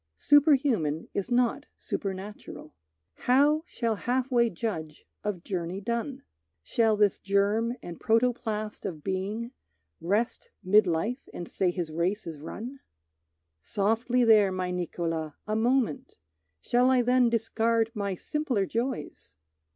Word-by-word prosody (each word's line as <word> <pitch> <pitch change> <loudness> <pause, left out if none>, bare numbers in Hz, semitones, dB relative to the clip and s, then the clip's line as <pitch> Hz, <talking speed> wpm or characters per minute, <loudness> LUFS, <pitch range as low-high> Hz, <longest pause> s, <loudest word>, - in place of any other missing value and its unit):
Superhuman 265 - +3
is 200 +3 -2
not 245 -1 +1
supernatural. 195 -4 -6 0.4
How 290 +5 +3
shall 230 -2 -1
half 255 +3 -1
way 235 -2 +4
judge 165 -7 -5 0.2
of 200 -5 -3
journey 180 0 -3
done? 235 +5 -3 0.4
Shall 220 - +2
this 205 -2 +3
germ 205 +4 +1
and 170 -1 -8
protoplast 225 -2 0
of 155 -5 -5
being 200 +5 -3 0.5
Rest 220 - -1
mid 200 +2 +5
life 210 +11 -2
and 175 - -5
say 185 - 0
his 175 -3 -3
race 180 +6 -1
is 160 -3 -7
run? 235 - -7 0.8
Softly 225 - +1
there, 215 -4 +6
my 185 -1 -2
Niccolo, 165 -3 -3
a 215 - -1
moment! 255 +3 0 0.5
Shall 245 +1 +3
I 255 -2 +4
then 250 0 +4
discard 225 0 +1
my 200 -4 -2
simpler 255 - -1
joys? 230 - -4
215 Hz, 125 wpm, -28 LUFS, 185-245 Hz, 0.8 s, there